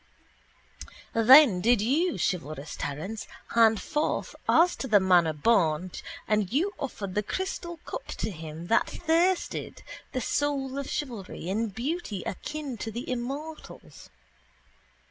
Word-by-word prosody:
Then 230 -3 +7
did 235 +3 +4
you, 300 - +1
chivalrous 155 -4 -3
Terence, 160 +11 -5 0.2
hand 225 -2 +4
forth, 300 -1 -2
as 345 +2 +5
to 265 - -4
the 210 -4 +6
manner 180 -4 +4
born, 165 0 +2
that - - -26
nectarous - - -6 0.2
beverage - - -33
and 205 +1 -3
you 365 +9 +1
offered 200 -8 -5
the 210 - +1
crystal 345 - -4
cup - - -6
to 215 - -3
him 160 -1 -8
that 225 - +2
thirsted, 345 +3 0 0.3
the 255 - -2
soul 275 +1 -1
of 280 - -5
chivalry, 230 - -5
in 220 +4 0
beauty 235 - -4
akin 285 - -5
to 225 - -4
the 235 +3 -6
immortals. 275 +6 -6
230 Hz, 140 wpm, -27 LUFS, 190-295 Hz, 0.3 s, Then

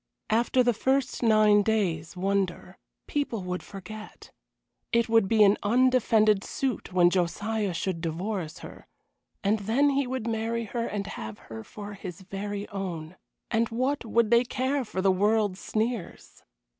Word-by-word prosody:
After 240 +3 +3
the 240 0 +3
first 265 +4 0
nine 215 -3 +5
days' 185 -6 -1
wonder, 195 -1 -1 0.3
people 260 -9 -2
would 180 0 -3
forget. 205 +2 -10 0.6
It 235 -1 +3
would 225 -3 +4
be 220 +1 +5
an 200 0 +5
undefended 220 -3 +3
suit 260 -8 -3
when 175 -1 +4
Josiah 200 +4 0
should 175 -1 -2
divorce 170 0 -3
her, - - -12 0.6
and 210 +2 +2
then 240 +8 +2
he 275 -1 0
would 255 -3 -3
marry 230 0 -1
her 230 +2 -3
and 205 -1 -3
have 110 - -7
her 110 -1 -9
for 205 - -9
his 185 -3 -8
very 200 +2 -5
own. 180 -4 -5 0.4
And 230 0 +2
what 255 +5 -1
would 230 -1 +1
they 235 +1 +6
care 260 +3 -1
for 190 -5 -4
the 195 - +5
world's 205 0 +1
sneers? 220 -4 -3
215 Hz, 150 wpm, -27 LUFS, 190-235 Hz, 0.6 s, they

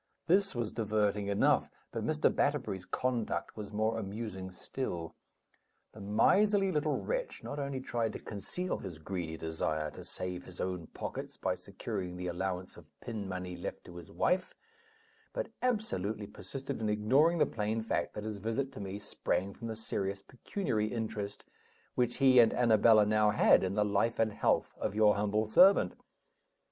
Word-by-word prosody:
This 195 -1 +3
was 120 -3 -2
diverting 105 -2 0
enough; 100 0 +3 0.2
but - - -3
Mr. - - +2
Batterbury's 95 -1 0
conduct 125 -4 -1
was 105 -1 -7
more 110 +2 0
amusing 100 -2 -5
still. 90 -3 -5 0.8
The 110 - -12
miserly 195 - +4
little 150 -2 +1
wretch - - -3
not 145 - -5
only 140 -1 -2
tried 115 -3 -1
to - - -5
conceal 145 - -4
his 90 -5 -7
greedy 80 -1 -4
desire 80 -1 -2
to - - -10
save 90 -1 -4
his 90 - -12
own 90 -3 -3
pockets - - -6
by - - 0
securing 90 -1 -5
the 90 - -5
allowance 90 +1 -3
of 80 -3 -15
pin 110 -5 -5
money 90 -1 -4
left 85 - -6
to 85 - -10
his 85 -1 -10
wife, 185 +1 +1 0.8
but - - -3
absolutely 110 - -1
persisted 135 +4 -6
in 110 - 0
ignoring 130 +11 +4
the - - +5
plain 110 +1 -2
fact 115 - -1
that 105 - -4
his 110 -1 -4
visit 115 +7 -2
to - - -9
me 100 0 -4
sprang 100 -1 -2
from 115 - -7
the 110 - -4
serious 100 -3 -3
pecuniary 125 - -2
interest 110 -3 -4 0.5
which 120 -1 +1
he 130 -2 +6
and 115 -2 +6
Annabella 110 -2 +6
now 105 0 +4
had 105 - +5
in 95 +1 -1
the 105 - +3
life 105 +3 +1
and 110 -2 +2
health - - +1
of - - -2
your 105 -1 +6
humble 105 +1 +1
servant. 185 - +6
105 Hz, 165 wpm, -32 LUFS, 95-125 Hz, 0.8 s, he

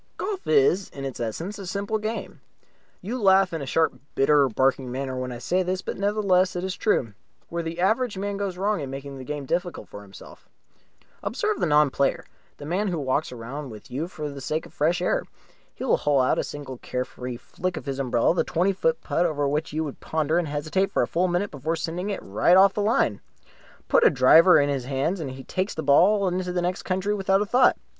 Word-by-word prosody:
Golf 390 0 -4
is 415 - +3
in 135 -1 -7
its 135 - -5
essence 165 - -4
a 195 - -7
simple 200 +3 -2
game. 220 +2 -5 0.6
You 235 +6 -4
laugh 190 -2 +4
in 165 - -3
a 140 - -5
sharp, 160 +4 +2 0.2
bitter, 140 0 +4
barking 130 +2 +1
manner 130 0 -3
when 130 0 -4
I 120 - -6
say 175 +10 0
this, 185 +1 -2
but - - -4
nevertheless 195 -3 +2
it 175 - -3
is 190 -1 -3
true. 120 - 0 0.4
Where 170 0 -2
the 165 +1 -5
average 220 +3 +1
man 200 +1 -3
goes 195 -2 -3
wrong 205 +1 0
is 145 - -3
in - - -8
making 135 0 -7
the - - -7
game 145 +1 -5
difficult 175 +5 -3
for 100 - -9
himself. 100 -1 -14 0.7
Observe 425 -3 -1
the - - +1
non 150 -2 +4
player, 140 +1 0 0.3
the 145 - -9
man 185 +7 -1
who 175 -3 -1
walks 140 0 -1
round 125 +4 -7
with 110 -2 -12
you 145 +7 -3
for 155 -4 -6
the 140 -1 -7
sake 155 +4 -2
of - - -14
the - - -30
fresh 170 +4 +1
air. - - +1 0.5
He - - -7
will - - +3
hole 145 -2 +2
out 130 - +2
with - - -1
a - - -8
single 135 -4 -7
care 125 0 -3
free 125 -1 -7
flick 180 +8 -4
of - - -7
his 135 -1 -4
umbrella 125 +1 +2
the 180 - +1
twenty 180 +4 +1
foot 240 +5 0
putt 175 +1 +1
over 145 -3 -1
which 150 +3 -1
you 155 +2 -1
would 145 -3 -6
ponder 160 +1 0
and 170 - -2
hesitate 155 +7 -1
for - - +2
a - - -1
full 180 +2 +1
minute 180 +3 -1
before 155 +4 -2
sending 170 +4 -3
it 200 - -4
right 110 - +3
off 195 +1 +6
the 210 - -1
line. 205 - +1 0.7
Put - - +4
a - - +7
driver 160 +8 +6
in 145 - +2
his 135 -3 -2
hands 140 +8 -1
and 150 -4 -4
he 130 0 -8
pastes 185 +8 -3
the 160 - -3
ball 190 +8 +4
into 180 0 -1
the 180 -1 -1
next 180 +1 -1
county 190 +2 0
without 195 -1 +2
a - - -5
thought. 245 +4 +4
165 Hz, 235 wpm, -25 LUFS, 140-190 Hz, 0.7 s, a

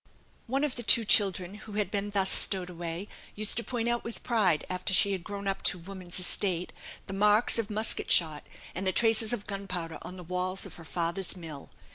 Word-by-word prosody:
One 270 +4 0
of 290 -4 -1
the - - -2
two 230 0 +5
children 190 -3 +3
who 210 0 -11
had 205 -2 -1
been 205 0 -2
thus 195 -2 +1
stowed 185 -2 +3
away 170 +2 -5 0.3
used 215 0 -1
to 235 - 0
point 235 -2 -3
out 240 0 0
with 230 - -8
pride, 195 -10 +2
after 185 +1 -1
she 200 +3 +4
had 190 -3 -3
grown 200 0 -6
up 195 - -1
to 180 - +4
woman's 180 0 -7
estate, 180 -1 +1 0.3
the 195 - -7
marks 210 +4 +4
of 225 -2 -2
musket 215 +1 +1
shot, 155 -3 +3 0.3
and 190 +2 -3
the 185 - +1
traces 225 -1 +2
of 235 -4 -3
gunpowder 180 -5 -5
on 185 - -9
the 180 - -9
walls 180 +2 -2
of - - -10
her 165 - -11
father's 170 +3 -2
mill. 160 -5 -9
195 Hz, 210 wpm, -29 LUFS, 180-215 Hz, 0.3 s, two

